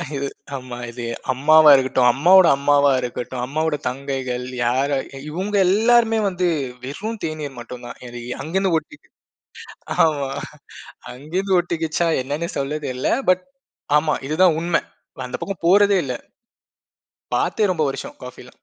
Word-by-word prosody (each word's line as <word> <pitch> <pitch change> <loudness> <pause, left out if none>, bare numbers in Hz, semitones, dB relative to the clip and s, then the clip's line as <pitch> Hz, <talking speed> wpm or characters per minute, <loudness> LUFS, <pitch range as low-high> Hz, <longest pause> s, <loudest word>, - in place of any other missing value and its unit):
இது 140 0 -2 0.3
ஆமா. 125 -2 -7
இது 120 0 -6 0.3
அம்மாவா 155 +3 +6
இருக்கட்டும், 130 -2 +3
அம்மாவோட 180 +5 +6
அம்மாவா 145 0 +3
இருக்கட்டும், 125 +1 -5
அம்மாவோட 155 +2 -1
தங்கைகள் 130 -2 -4 0.2
யாரா 135 +3 +1 0.3
இவுங்க 190 +6 -3
எல்லாருமே 225 +2 +3
வந்து 180 -1 -1 0.4
வெறும் 210 +11 -5
தேநீர் 150 -5 -5
மட்டும்தான். 120 0 -9
இது 120 0 -8 0.2
அங்கிருந்து 185 +3 0
ஒட்டிக் 165 - -9 1.0
ஆமா. 140 -4 -1 0.8
அங்கருந்து 180 +9 -1
ஒட்டிக்கிச்சா? 170 -1 -1
என்னன்னே 145 +6 -3
சொல்லத் 145 +2 -3
தெரில. 130 0 -2 0.2
பட் 185 0 +2 0.5
ஆமா 155 0 0
இதுதான் 165 +1 +3
உண்மை. 170 0 +1 0.5
அந்தப் 125 - -6
பக்கம் 195 -4 -5
போறதே 200 +1 +5
இல்ல. 125 - -3 1.2
பார்த்தே 215 - +1
ரொம்ப 160 -4 0
வருஷம் - - -8
காஃபிலாம். 125 0 -12
150 Hz, 120 wpm, -21 LUFS, 130-180 Hz, 1.2 s, அம்மாவா